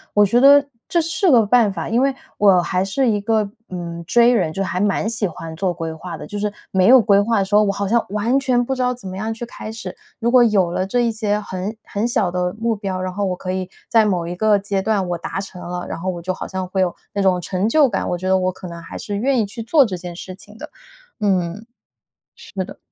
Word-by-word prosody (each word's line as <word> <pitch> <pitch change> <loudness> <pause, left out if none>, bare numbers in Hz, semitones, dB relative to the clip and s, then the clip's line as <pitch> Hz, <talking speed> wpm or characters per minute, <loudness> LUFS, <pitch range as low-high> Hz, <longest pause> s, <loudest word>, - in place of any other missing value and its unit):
我 205 0 +6
觉 235 +5 +3
得 285 +1 +7 0.2
这 345 - +1
是 330 +3 +1
个 235 -7 +5
办 225 -1 +4
法， 195 - -5
因 235 +3 +1
为 275 0 +2 0.3
我 195 -3 +6
还 180 +1 0
是 250 +7 0
一 210 -3 +1
个， 215 0 +1 0.2
嗯 170 -2 -6
，J 240 +4 +5
人， 180 -9 +1
就 195 +5 -2
还 180 -1 -2
蛮 205 +1 +1
喜 225 -2 -1
欢 165 -1 -8
做 185 +2 0
规 165 -2 -5
划 165 +2 -7
的， - - -8
就 205 -1 -6
是 210 0 -1 0.2
没 185 -1 +3
有 260 +2 +9
规 200 -3 +4
划 225 +2 +1
的 195 - +2
时 200 - -9
候， 210 - +6
我 200 - +1
好 200 0 -3
像 235 +3 +2
完 215 +6 +1
全 250 -3 +1
不 265 - -1
知 260 - -3
道 250 0 +1
怎 235 -5 -11
么 185 - -6
样 215 +4 -3
去 225 +2 -5
开 220 -2 -8
始。 220 0 -7 0.2
如 235 0 0
果 250 -1 +7
有 195 -6 +2
了 185 +2 -1
这 245 +5 +1
一 235 -1 +1
些 210 -2 -1
很 200 +1 -5
很 205 +3 -2
小 195 -6 0
的 180 0 -1
目 230 0 0
标， 195 -3 -4
然 185 0 -3
后 200 +1 -1
我 185 - -1
可 185 0 -5
以 185 0 -3 0.2
在 225 -2 +4
某 180 -5 0
一 175 +1 -5
个 215 +2 +3
阶 200 -1 -2
段 195 -2 0
我 175 - -1
达 190 +2 -4
成 190 -2 -8
了， 180 0 -5
然 165 - -5
后 185 +3 -3
我 175 -2 -4
就 185 +2 -3
好 - - -6
像 190 -1 -4
会 190 +1 -1
有 180 -2 0 0.2
那 200 - -1
种 185 -2 +3
成 185 +4 -1
就 295 +3 +5
感， 205 -6 -2
我 175 - -1
觉 185 +2 -5
得 190 0 +3
我 185 0 0
可 185 - -10
能 170 -1 -8
还 165 - -9
是 205 - -5
愿 260 +4 +1
意 220 - +2
去 220 +4 -7
做 275 +5 +4
这 200 -5 -4
件 175 -1 -8
事 185 +1 -8
情 205 +3 -14
的， - - -9 0.5
嗯， 190 -1 0 0.7
是 - - -14
的。 - - -11
200 Hz, 290 characters per minute, -20 LUFS, 185-230 Hz, 0.7 s, 有